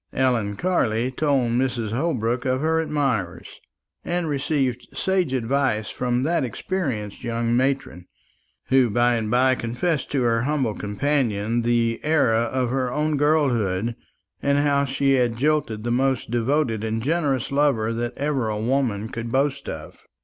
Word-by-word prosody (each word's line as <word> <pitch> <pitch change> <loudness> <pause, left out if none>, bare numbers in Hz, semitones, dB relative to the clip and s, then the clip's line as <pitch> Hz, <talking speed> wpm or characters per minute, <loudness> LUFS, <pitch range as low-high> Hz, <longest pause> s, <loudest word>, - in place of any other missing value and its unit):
Ellen 120 -6 +1
Carley 120 - 0
told 135 -3 +1
Mrs. 120 -3 0
Holbrook 125 -3 -1
of 130 -1 0
her 160 +1 +2
admirers, 120 - -2 0.4
and 175 -1 -1
received 135 -4 -1
sage 190 -6 0
advice 130 -3 0
from 125 0 -1
that 165 +1 +1
experienced 125 - -3
young 115 0 0
matron, 130 -8 -1 0.6
who 130 -2 +4
by 120 +3 +3
and 110 -2 -1
by 130 +3 +4
confessed 125 +6 -2
to 135 -3 +1
her 115 -1 +2
humble 130 -4 0
companion 115 0 -1
the 115 -1 +1
error 150 -7 +2
of 120 +2 0
her 130 -1 0
own 150 +2 0
girlhood, 120 -8 +1 0.5
and 140 0 +2
how 140 -1 +2
she 135 0 +1
had 120 -3 +1
jilted 135 -6 0
the 120 - -1
most 130 -1 0
devoted 120 -2 0
and 110 0 -2
generous 145 -5 0
lover 135 -6 +2
that 120 +1 -3
ever 140 -5 -1
a 105 -1 -2
woman 115 -3 0
could 115 0 -6
boast 140 +1 0
of. - - -9
125 Hz, 150 wpm, -23 LUFS, 115-140 Hz, 0.6 s, who